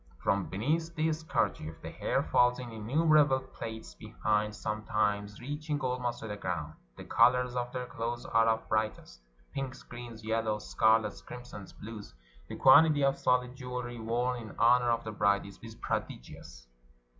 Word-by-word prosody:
From 100 -1 +1
beneath 160 - -1
this 160 0 0
kerchief 80 - -2
the - - -6
hair - - 0
falls 125 0 +3
in 125 -2 -7
innumerable 140 +5 +3
plaits 110 -4 -8
behind, 105 -1 -1
sometimes 105 -1 -1
reaching 145 +3 -3
almost 125 -2 -2
to 110 - -6
the 105 -1 -5
ground. - - -3 0.2
The - - -8
colors 125 0 +3
of 125 0 -2
their 125 0 -4
clothes 120 0 -4
are 115 0 +3
of 110 0 +2
the - - -22
brightest 110 - -2 0.2
— - - -33
pinks, 135 -2 -5
greens, 120 -2 -9
yellows, 110 -1 -1
scarlets, 110 -1 +2
crimsons, 125 -5 -10
blues. 105 - -10 0.3
The - - -5
quantity 155 -3 +6
of 135 0 +4
soUd 125 0 +2
jewelry 125 -2 -5
worn 120 +2 -1
in 110 -3 -10
honor 120 +1 +5
of 115 -1 +1
the 110 - -5
bride 100 -1 +2
is 100 -1 -12 0.2
prodigious. - - -6
120 Hz, 160 wpm, -31 LUFS, 110-125 Hz, 0.3 s, quantity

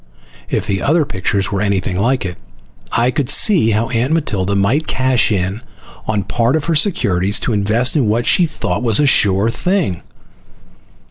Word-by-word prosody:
If - - -1
the 100 -2 -2
other 155 +1 +2
pictures 95 -1 -2
were 100 -1 -2
anything 100 -3 -1
like 115 +4 0
it, 90 -1 -5 0.6
I 120 +2 +1
could 130 -1 -2
see 180 - +4
how 110 +1 0
Aunt 120 +4 -1
Matilda 100 - -1
might 110 +11 0
cash 130 -3 +1
in 95 +2 -2 0.5
on 105 -2 -1
part 115 +5 0
of 155 - -2
her 170 - 0
securities 100 - +1
to 120 - -1
invest 110 +6 0
in 135 -7 +1
what 115 +3 0
she 175 - +3
thought 90 - -3
was 115 -4 0
a 150 - +3
sure 105 -4 +3
thing. 175 - -1
110 Hz, 175 wpm, -16 LUFS, 100-130 Hz, 0.6 s, see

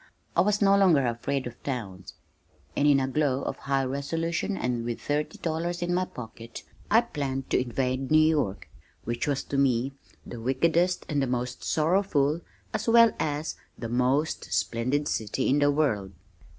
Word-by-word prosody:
I - - +5
was 205 +1 +2
no 200 0 +6
longer 175 -9 +4
afraid 130 +3 -2
of 120 -1 -8
towns, 100 -9 -5 0.6
and 145 - +3
in 140 -2 +5
a 130 - 0
glow 140 -1 0
of - - -3
high 135 -1 0
resolution 165 +8 -2
and 120 -2 -1
with 120 0 -3
thirty 150 +1 -2
dollars 170 +2 -2
in 175 0 -1
my 185 +1 +1
pocket, 115 -4 -9 0.3
I 225 +2 +6
planned 140 - -4
to - - +3
invade 130 +1 -2
New 155 - +5
York 155 -11 +2 0.4
which 120 +4 -2
was 140 -2 0
to 140 - -2
me 135 0 +2 0.3
the 120 - -8
wickedest 170 +8 +1
and 145 -4 0
the 135 - 0
most 125 0 -3
sorrowful 160 -2 +1 0.3
as - - -2
well 230 0 +7
as 150 +1 -2 0.2
the 115 - -5
most 130 +6 0
splendid 130 +6 0
city 110 +4 -1
in 140 +3 +3
the 145 0 +4
world. 125 -11 0
140 Hz, 170 wpm, -27 LUFS, 125-160 Hz, 0.6 s, well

